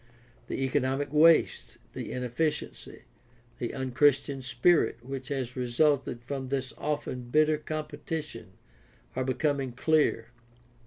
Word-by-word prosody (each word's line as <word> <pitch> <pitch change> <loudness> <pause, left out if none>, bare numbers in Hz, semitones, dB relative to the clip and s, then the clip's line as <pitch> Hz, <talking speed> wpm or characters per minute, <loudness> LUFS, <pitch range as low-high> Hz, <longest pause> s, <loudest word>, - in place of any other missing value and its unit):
The 135 - -2
economic 135 +1 0
waste, 160 +2 +4 0.2
the - - -6
inefficiency, 125 +5 -3 0.6
the 120 - -2
un 130 -1 -3
Christian 140 0 +2
spirit 130 +4 +2
which 135 -1 -6
has 130 -3 -3
resulted 125 0 +1
from 130 +1 -4
this 135 -1 -2
often 130 -4 -3
bitter 155 +2 +3
competition 155 - -5 0.6
are 130 - 0
becoming 135 0 -1
clear. 130 -4 +1
135 Hz, 110 wpm, -28 LUFS, 125-150 Hz, 0.6 s, waste